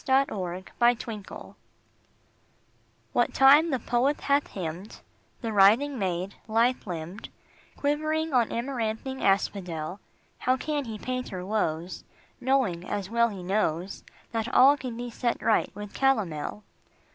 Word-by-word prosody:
POETRY 195 -10 0 0.2
EVERYWHERE 230 -3 -1 1.6
WHAT - - +2
time 285 +5 +7
the 265 - +1
poet 250 +4 0
hath 285 +1 +2
hymned 180 +2 -6 0.4
The 225 -3 -3
writhing 225 +8 +5
maid, 185 0 -2
lithe 230 +2 +1
limbed, 175 +3 -6 0.5
Quivering 310 +2 0
on 240 -3 +3
amaranthine 240 +1 -3
asphodel, 185 -3 0 0.4
How 255 +1 +2
can 295 0 -2
he 220 -2 -6
paint 255 +3 -4
her 180 -1 -6
woes, 175 -5 -2 0.4
Knowing, 245 -10 +1
as 200 +1 -4
well 235 0 +3
he 195 -4 -7
knows, 185 -2 -1 0.3
That 230 +2 -2
all 275 +3 +7
can 255 -5 -6
be 240 0 -5
set 235 0 -1
right 220 - +2
with 205 0 -8
calomel? 210 - 0
225 Hz, 125 wpm, -27 LUFS, 190-260 Hz, 1.6 s, time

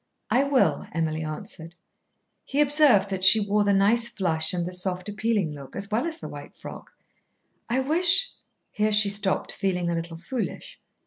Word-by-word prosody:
"I 265 +3 +2
will," 280 -2 0
Emily 160 -1 -2
answered. 160 +2 -8 0.7
He 280 - -4
observed 285 -9 +4
that 190 -1 -4
she 190 +3 +8
wore 205 0 0
the 205 - +1
nice 210 +4 +3
flush 165 -8 +1
and 175 -2 -3
the 180 - -5
soft 180 0 -1
appealing 210 -4 -2
look, 140 -2 -12
as 200 +1 -5
well 235 +9 -1
as 325 -1 -6
the - - -9
white - - -11
frock. - - -11 0.8
"I 250 +3 0
wish 345 - +3 0.2
" - - -52
Here 215 0 -1
she 210 -1 +6
stopped, 200 -1 -1
feeling 180 -3 -2
a - - -1
little 165 0 -5
foolish. 255 - -6
200 Hz, 180 wpm, -24 LUFS, 175-235 Hz, 0.8 s, she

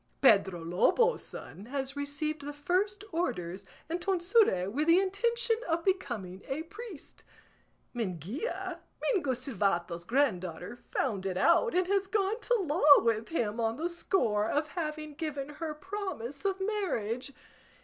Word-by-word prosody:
Pedro 195 -8 +4
Lobo's 460 - +3
son 200 +4 -8
has 270 +1 -3
received 290 +2 -3
the 290 +1 -5
first 375 +8 0
orders 195 - -2 0.2
and 340 +2 -3
tonsure, 365 - +3
with 285 +10 -1
the 335 +1 +7
intention 455 +5 +1
of 330 +1 0
becoming 225 - -1
a 280 +4 -2
priest. 410 -1 -10 0.7
Minguilla, 220 - -3 0.2
Mingo 340 - +1
Silvato's 190 -9 -1
granddaughter, 190 - 0
found 200 -7 -1
it 185 -1 -2
out, 470 - +4
and 365 0 +3
has 395 +1 +1
gone 410 +2 0
to - - +1
law 300 -7 +6
with 225 -1 +1
him 235 -8 -1
on 225 0 0
the 335 +3 -1
score 225 - +1
of 300 +1 0
having 305 -2 -4
given 290 -3 -4
her 305 +1 -5
promise 375 - -5
of 390 -1 +1
marriage. 295 - -1
290 Hz, 140 wpm, -30 LUFS, 225-375 Hz, 0.7 s, the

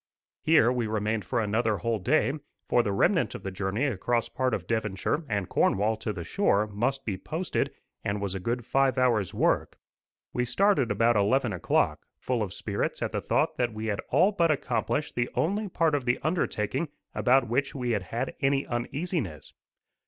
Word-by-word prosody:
Here 155 -7 +5
we 120 -3 -1
remained 110 -1 -1
for 120 +6 0
another 110 0 +1
whole 115 0 -1
day, 135 +6 +2 0.3
for 120 - +4
the 105 -4 -1
remnant 100 - +2
of - - -8
the 95 - -4
journey 95 +7 -1
across 120 -1 0
part 130 -1 0
of - - -2
Devonshire 110 - -1
and 100 -4 -1
Cornwall 105 +3 +2
to 110 0 -3
the 90 -4 -5
shore 105 - +2
must 120 +6 -2
be 95 -4 -3
posted, 165 - -2 0.3
and 100 +1 -1
was 100 -2 -2
a 95 - -3
good 120 +5 -2
five 135 +1 +2
hours' 115 -7 +2
work. - - +1 0.6
We 125 - +1
started 135 - +2
about 115 +3 +3
eleven 110 +3 +2
o'clock, 90 - 0
full 125 -3 -1
of 100 -4 -2
spirits - - -3
at - - -2
the - - -2
thought - - +1
that 120 -3 0
we 110 +1 -4
had 105 -2 -1
all 175 +10 +4
but 170 -5 +2
accomplished 150 0 -1
the 120 0 -1
only 200 +5 0
part 165 -3 +1
of 140 -4 0
the 125 0 +2
undertaking 150 - -1 0.2
about 130 0 +3
which 135 +5 -1
we 125 -3 -1
had 105 - +1
had 115 +7 -3
any 135 0 +2
uneasiness. 120 - -3
120 Hz, 185 wpm, -28 LUFS, 105-135 Hz, 0.6 s, Here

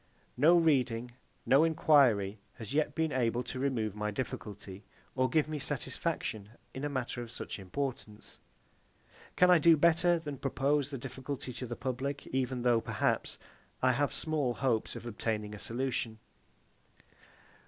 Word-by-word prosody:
No 160 +7 +6
reading, 125 -7 +2 0.3
no 135 +4 +5
enquiry 130 -11 +4 0.2
has 115 +2 -7
yet 150 -1 +1
been 160 -1 0
able 120 -1 0
to 130 - -6
remove 120 -6 -1
my 105 0 -2
difficulty, 105 -3 -6 0.3
or 130 0 +1
give 150 +3 +2
me 155 -1 -4
satisfaction 135 - -3 0.2
in 135 - -6
a 145 - -1
matter 130 -3 -3
of 120 - -7
such - - -6
importance. 105 +1 -5 1.0
Can 180 0 +5
I 175 - +7
do 165 +1 +6
better 170 +2 +4
than 150 -4 -6
propose 140 +1 0
the 140 - -5
difficulty 130 +1 -6
to 125 - -6
the 120 - -4
public, 135 +3 -3
even 130 -1 -1
though, 120 -2 +3
perhaps, - - -1 0.5
I 130 - +5
have 140 +3 +1
small 145 -6 -1
hopes 120 -5 0
of - - -8
obtaining 105 -2 -3
a 105 - -8
solution? 120 -2 -2
130 Hz, 150 wpm, -31 LUFS, 115-145 Hz, 1.0 s, I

